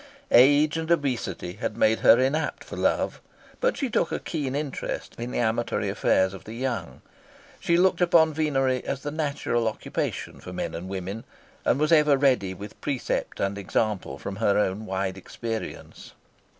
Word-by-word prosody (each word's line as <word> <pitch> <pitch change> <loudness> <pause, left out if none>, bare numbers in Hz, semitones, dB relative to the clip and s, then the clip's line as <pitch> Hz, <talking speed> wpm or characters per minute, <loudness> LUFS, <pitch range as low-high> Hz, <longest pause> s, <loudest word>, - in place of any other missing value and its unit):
Age 145 +5 +6
and 160 0 -3
obesity 125 - -1
had 105 - -3
made 110 +1 +3
her 115 - +7
inapt 135 +5 0
for - - -8
love, - - 0 0.4
but - - +1
she 275 - -1
took 210 - 0
a - - 0
keen 140 -5 -3
interest 145 -1 -4
in 120 +1 -4
the - - -3
amatory 120 0 0
affairs 95 0 +2
of 95 - -10
the 110 - -8
young. 125 0 -4 0.6
She 170 - +2
looked 185 +1 +3
upon 165 -2 +5
venery 135 -4 +1
as 140 - -4
the 145 - -3
natural 140 -6 -1
occupation 110 - -3
for - - -9
men - - -4
and 85 +3 -6
women, 95 +3 -5 0.4
and 125 - +2
was 155 +2 +2
ever 150 -3 +5
ready 125 -9 +2
with 100 +3 -10
precept 135 -4 -2
and 100 +1 -1
example 100 -7 -1
from 95 +6 -6
her 100 -2 +2
own 105 +1 0
wide 95 0 -2
experience. 115 +4 -6
125 Hz, 170 wpm, -26 LUFS, 100-150 Hz, 0.6 s, her